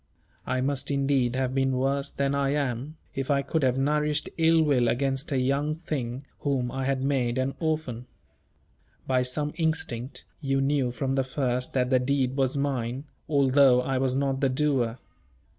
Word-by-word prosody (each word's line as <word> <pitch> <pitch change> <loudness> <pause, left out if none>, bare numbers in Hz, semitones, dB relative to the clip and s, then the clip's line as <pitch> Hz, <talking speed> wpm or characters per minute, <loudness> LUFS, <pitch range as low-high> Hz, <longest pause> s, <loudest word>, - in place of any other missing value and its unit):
I 130 - 0
must 135 0 -1
indeed 135 -3 +1
have 130 -1 0
been 135 0 +1
worse 135 +2 0
than 140 0 -1
I 140 0 +1
am, 140 +1 -2 0.2
if 135 +1 -3
I 140 -1 +2
could 160 +3 -1
have 130 -1 +2
nourished 150 +2 0
ill 165 0 +5
will 135 -5 +3
against 135 +4 -1
a 135 - +1
young 140 +4 +1
thing, 135 -5 -4
whom 130 -4 -1
I 135 0 -3
had 135 -1 0
made 130 -3 0
an 130 +1 0
orphan. 155 -7 -2 1.0
By 130 -1 +2
some 145 +4 -2
instinct, 150 -6 -2
you 135 -2 0
knew 135 -2 +1
from 130 +2 -2
the 135 0 +2
first 130 -1 -2
that 125 -1 +1
the 130 - +5
deed 130 0 0
was 135 0 +1
mine, 130 -2 -2 0.3
although 135 -3 +5
I 130 0 -1
was 130 -1 0
not 135 -1 0
the 135 - +3
doer. 130 -4 0
135 Hz, 175 wpm, -27 LUFS, 130-140 Hz, 1.0 s, ill